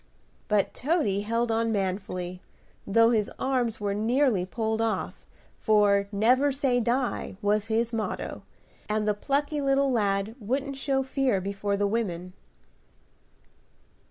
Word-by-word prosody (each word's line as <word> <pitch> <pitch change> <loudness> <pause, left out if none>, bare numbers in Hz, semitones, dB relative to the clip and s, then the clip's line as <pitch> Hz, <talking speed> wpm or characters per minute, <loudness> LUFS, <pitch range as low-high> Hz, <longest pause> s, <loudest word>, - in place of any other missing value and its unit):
But 210 -2 +1
Toady 275 - 0
held 230 +2 0
on 225 0 +1
manfully, 185 -2 -3 0.5
though 230 +3 +5
his 215 -3 +1
arms 250 -4 0
were 205 -1 -1
nearly 225 -2 +1
pulled 220 +1 -1
off, 225 -1 -2 0.3
for 205 -2 +3
"Never 250 +7 +3
say 265 -2 +1
die," 240 -4 -1
was 210 0 +1
his 230 +1 0
motto, 225 -1 -3 0.5
and 210 0 0
the 210 - +3
plucky 285 +7 -1
little 275 0 +2
lad 200 -2 0
wouldn't 270 +6 -2
show 270 -1 0
fear 265 -5 0
before 200 +1 -2
the 205 - +1
women. 185 -5 -2
220 Hz, 130 wpm, -27 LUFS, 200-255 Hz, 0.5 s, though